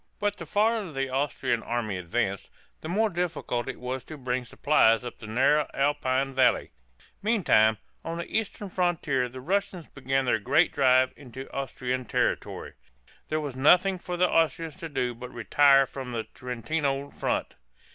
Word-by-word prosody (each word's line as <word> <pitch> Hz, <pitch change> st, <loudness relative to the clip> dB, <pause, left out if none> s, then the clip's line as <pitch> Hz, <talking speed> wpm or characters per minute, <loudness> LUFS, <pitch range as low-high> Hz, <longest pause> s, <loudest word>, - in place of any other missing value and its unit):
But 205 Hz, -1 st, -1 dB
the 170 Hz, -3 st, -8 dB
farther 210 Hz, 0 st, +1 dB
the 135 Hz, -2 st, -2 dB
Austrian 130 Hz, -3 st, -1 dB
army 115 Hz, -4 st, -2 dB
advanced, 95 Hz, +2 st, -2 dB, 0.3 s
the 160 Hz, -, -6 dB
more 215 Hz, +4 st, +1 dB
difficult 165 Hz, -8 st, -2 dB
it -, -, -6 dB
was 125 Hz, 0 st, -4 dB
to 155 Hz, -, -9 dB
bring 125 Hz, -1 st, -2 dB
supplies 120 Hz, -3 st, +3 dB
up 120 Hz, -, -7 dB
the 110 Hz, -, -9 dB
narrow 135 Hz, +7 st, +2 dB
Alpine 135 Hz, -1 st, +1 dB
valleys. 130 Hz, -1 st, +2 dB, 0.5 s
Meantime, 160 Hz, -, +3 dB, 0.3 s
on 165 Hz, 0 st, -4 dB
the 170 Hz, -, -4 dB
eastern 215 Hz, -1 st, -3 dB
frontier 160 Hz, -9 st, 0 dB
the 130 Hz, +2 st, -9 dB
Russians 185 Hz, +1 st, -2 dB
began 135 Hz, 0 st, -1 dB
their 110 Hz, -3 st, +2 dB
great 140 Hz, -, +3 dB
drive 130 Hz, -2 st, +4 dB
into 130 Hz, -1 st, -10 dB
Austrian 130 Hz, -2 st, -3 dB
territory. -, -, -2 dB, 0.5 s
There 155 Hz, -, -1 dB
was 145 Hz, -4 st, -5 dB
nothing 180 Hz, +7 st, +4 dB
for 180 Hz, 0 st, -5 dB
the 180 Hz, +1 st, +4 dB
Austrians 160 Hz, -1 st, 0 dB
to 165 Hz, -3 st, -7 dB
do 125 Hz, -4 st, -1 dB
but 125 Hz, +1 st, -9 dB
retire 135 Hz, +4 st, +4 dB
from 130 Hz, -2 st, -7 dB
the 115 Hz, -1 st, -2 dB
Trentino 135 Hz, +4 st, -3 dB
front. -, -, -2 dB
135 Hz, 160 wpm, -27 LUFS, 125-165 Hz, 0.5 s, drive